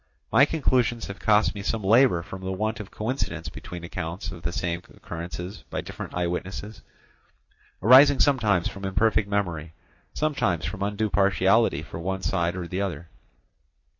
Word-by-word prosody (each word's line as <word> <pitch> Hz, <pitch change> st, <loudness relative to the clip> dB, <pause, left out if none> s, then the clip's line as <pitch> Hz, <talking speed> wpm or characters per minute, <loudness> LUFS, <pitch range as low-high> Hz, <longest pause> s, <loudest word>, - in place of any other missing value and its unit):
My 125 Hz, +6 st, +7 dB
conclusions 125 Hz, -7 st, +1 dB
have 100 Hz, -, -8 dB
cost 105 Hz, 0 st, +3 dB
me 100 Hz, -, -6 dB
some 105 Hz, +2 st, -2 dB
labour 110 Hz, -4 st, +4 dB
from 95 Hz, +1 st, -9 dB
the 95 Hz, 0 st, -3 dB
want 110 Hz, +4 st, -2 dB
of 105 Hz, -, -7 dB
coincidence 100 Hz, -, -3 dB
between 85 Hz, +2 st, -9 dB
accounts 85 Hz, +1 st, -5 dB
of 85 Hz, -, -9 dB
the 85 Hz, -, -2 dB
same 85 Hz, 0 st, -2 dB
occurrences 85 Hz, 0 st, -7 dB
by -, -, -3 dB
different -, -, -8 dB
eye 90 Hz, 0 st, 0 dB
witnesses, 95 Hz, +4 st, -5 dB, 1.0 s
arising 135 Hz, +4 st, +8 dB
sometimes 110 Hz, -, +3 dB
from 100 Hz, -, -8 dB
imperfect 100 Hz, +2 st, +1 dB
memory, 85 Hz, -6 st, -2 dB, 0.4 s
sometimes 135 Hz, -, 0 dB
from 95 Hz, -, -5 dB
undue 105 Hz, +1 st, -1 dB
partiality 95 Hz, -2 st, +3 dB
for 80 Hz, -, -8 dB
one 95 Hz, +3 st, -3 dB
side 85 Hz, -1 st, 0 dB
or 90 Hz, -2 st, -4 dB
the 90 Hz, +3 st, -3 dB
other. 85 Hz, -4 st, -4 dB
95 Hz, 160 wpm, -25 LUFS, 85-110 Hz, 1.0 s, arising